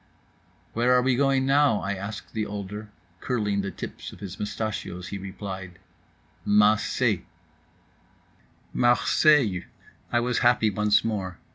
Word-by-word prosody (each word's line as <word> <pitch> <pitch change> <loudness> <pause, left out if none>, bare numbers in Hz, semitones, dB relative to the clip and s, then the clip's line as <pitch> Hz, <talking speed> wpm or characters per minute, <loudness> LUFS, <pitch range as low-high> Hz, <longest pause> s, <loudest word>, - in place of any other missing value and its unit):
"Where 120 +2 +3
are 125 - +5
we 130 -1 +2
going 135 0 +2
now?" 140 -5 +4
I 95 - -2
asked 100 +3 -7
the 110 -1 -2
older. 105 +1 -6 0.3
Curling 105 -5 -1
the 100 - -3
tips - - -8
of - - -13
his 100 -1 -8
mustachios, 105 -4 -4
he 100 - -5
replied, 95 -2 -7 0.7
"Mah 105 +1 +5
say." 105 - 0 1.5
Marseilles! 120 - +3 0.5
I 120 - +3
was 120 +1 0
happy 120 -3 +3
once 105 +1 +3
more. 95 -6 -3
105 Hz, 130 wpm, -26 LUFS, 100-120 Hz, 1.5 s, are